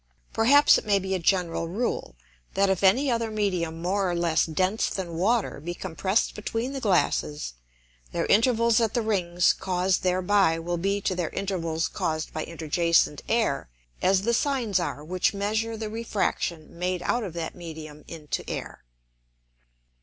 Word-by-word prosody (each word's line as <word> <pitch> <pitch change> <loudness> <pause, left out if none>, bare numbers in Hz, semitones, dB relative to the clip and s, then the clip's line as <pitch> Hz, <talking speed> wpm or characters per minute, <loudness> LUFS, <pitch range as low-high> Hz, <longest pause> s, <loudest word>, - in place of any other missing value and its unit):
Perhaps 280 +6 +6
it - - -11
may 200 -1 +4
be 190 0 -2
a 190 - 0
general 170 -1 +1
Rule, 195 - -3 0.4
That 195 0 +3
if 190 - -1
any 255 +8 +4
other 230 -1 0
Medium 180 -6 -2
more 190 +1 +1
or 175 - -1
less 170 -2 +2
dense 185 +6 0
than 180 -3 -4
Water 205 +1 +1
be 175 +4 -5
compress'd 190 +4 -1
between 225 +5 -3
the 275 - -3
Glasses, 160 - 0 0.6
their - - -1
Intervals 230 +1 +4
at 225 0 0
the 240 - +1
Rings 180 -5 +2
caused 185 0 0
thereby 185 -1 +2
will 175 +1 -3
be 200 +3 0
to 190 - 0
their 175 -3 -2
Intervals 170 -5 -2
caused 155 -1 -3
by 155 - -3
interjacent 165 -1 +1
Air, 220 - +1 0.3
as 190 +1 +3
the 235 +2 +1
Sines 235 -7 +1
are 160 -4 -3
which 185 +4 0
measure 220 +3 -1
the 220 0 -4
Refraction 190 -7 -2
made 180 0 -1
out 240 -1 0
of 190 -6 -5
that 165 -2 -4
Medium 155 -3 -9
into 155 -3 -5
Air. - - -6
185 Hz, 160 wpm, -26 LUFS, 170-215 Hz, 0.6 s, Perhaps